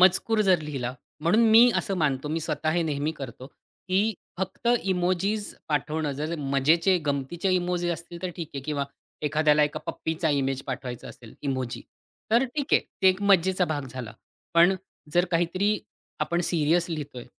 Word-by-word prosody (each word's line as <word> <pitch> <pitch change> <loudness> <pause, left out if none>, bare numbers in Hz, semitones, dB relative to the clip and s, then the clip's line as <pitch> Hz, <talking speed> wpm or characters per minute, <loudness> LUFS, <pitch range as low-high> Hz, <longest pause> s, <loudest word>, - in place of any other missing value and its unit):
मजकूर 190 +4 +4
जर 185 -3 +5
लिहिला 135 -5 -4 0.3
म्हणून 170 +8 +3
मी 235 +3 +8
असं 200 - -1
मानतो. 150 -4 0
मी 160 +2 -1
स्वतः 155 0 -1
हे 175 +1 +1
नेहमी 150 -1 -1
करतो, 130 -4 -8 0.4
की 200 +4 +2 0.2
फक्त 190 +5 -2
इमोजीज 190 +3 0
पाठवणं 150 0 -1
जर 155 +4 -3
मजेचे, 150 +6 +3
गमतीचे 145 +7 -1
इमोजीज 175 -1 0
असतील 170 +1 -8
तर 185 - -2
ठीक 165 -3 -5
आहे 140 - -3
किंवा 145 -1 -1 0.4
एखाद्याला 150 0 +3
एका 150 - -3
पप्पीचा 160 0 -1
इमेज 135 -2 0
पाठवायचा 125 -2 -5
असेल, 115 -2 -13
इमोजी. 130 -3 -3 0.5
तर 235 +3 +5
ठीक 275 +2 -3
आहे. - - +6 0.2
ते 190 - +8
एक 185 +2 +1
मजेचा 190 -2 +4
भाग 145 -5 -3
झाला. 120 -3 -6 0.4
पण 170 +3 +6 0.4
जर 175 +2 +4
काहीतरी 185 +5 +1 0.4
आपण 170 +3 0
सीरियस 170 +1 +2
लिहितोय. 145 -6 -5
165 Hz, 160 wpm, -26 LUFS, 145-185 Hz, 0.5 s, मी